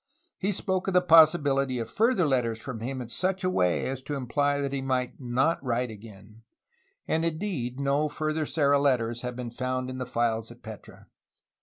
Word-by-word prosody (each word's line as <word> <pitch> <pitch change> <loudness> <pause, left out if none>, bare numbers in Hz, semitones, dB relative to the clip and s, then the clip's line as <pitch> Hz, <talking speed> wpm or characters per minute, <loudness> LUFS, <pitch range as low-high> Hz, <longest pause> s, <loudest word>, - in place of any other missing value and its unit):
He 200 +2 0
spoke 190 -1 -1
of 190 - 0
the 180 - +6
possibility 150 -6 +5
of 115 - -3
further 225 -5 +2
letters 125 -5 +1
from 120 -1 -6
him 130 +3 -4
in 115 - -11
such 185 +8 -1
a 185 - +1
way 90 - +1
as 130 0 -3
to 145 +2 -4
imply 145 +2 0
that 140 -1 -2
he 135 - -2
might 130 -2 -2
not 130 +6 0
write 125 -1 -1
again, 105 0 -13 0.3
— 395 -5 -42
and 160 +1 +1
indeed 155 - -2
no 140 +2 +1
further 155 +1 -2
Serra 140 -1 +3
letters 120 -4 +1
have 125 -1 -5
been 120 -1 -5
found 130 +1 -3
in 130 - -6
the 125 - -4
files 115 -2 -1
at 120 +1 -15
Petra. 110 -2 -11
135 Hz, 195 wpm, -27 LUFS, 120-155 Hz, 0.3 s, the